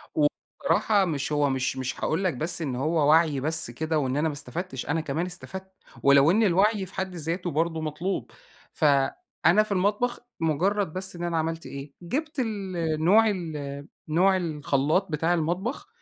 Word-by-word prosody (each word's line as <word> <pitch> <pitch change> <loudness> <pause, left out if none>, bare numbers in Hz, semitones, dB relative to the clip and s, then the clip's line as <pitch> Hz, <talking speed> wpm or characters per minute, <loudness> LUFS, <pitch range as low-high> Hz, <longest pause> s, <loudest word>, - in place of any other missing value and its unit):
وبصراحة 200 - +1
مش 150 -3 -2
هو 145 -1 +2
مش 130 0 -1
مش 130 0 -3
هاقول 165 +5 0
لك 185 - +1
بس 165 +7 -2
إن 135 -6 -2
هو 150 +3 +1
وعْي 155 -3 +4
بس 155 -3 -1
كده 155 +4 -1
وإن 130 0 -1
أنا 160 +2 +1
ما 150 - -4
استفدتش، 150 -1 -5
أنا 160 +2 0
كمان 155 +3 -2
استفدت، 190 +1 -7 0.3
ولو 140 +3 +6
إن 220 +4 +3
الوعي 200 +1 +3
في 190 - -13
حد 190 -1 -3
ذاته 170 +2 -3
برضه 160 +1 0
مطلوب، 160 +5 -3 0.4
ف 155 - 0 0.6
أنا 210 +5 +6
في 215 - -10
المطبخ 205 +6 +1 0.2
مجرّد 170 +3 +1
بس 185 -1 -3
إن 175 - -6
أنا 170 -1 -1
عملت 160 +1 -2
إيه، 140 +1 -8
جِبت 300 - -3
ال 205 -6 -2 0.3
نوع، 215 +6 +6
ال 150 -7 -5 0.2
نوع 185 +5 +3
الخلّاط 155 0 0
بتاع 165 +3 +1
المطبخ 175 - -2
165 Hz, 170 wpm, -26 LUFS, 150-190 Hz, 0.6 s, ولو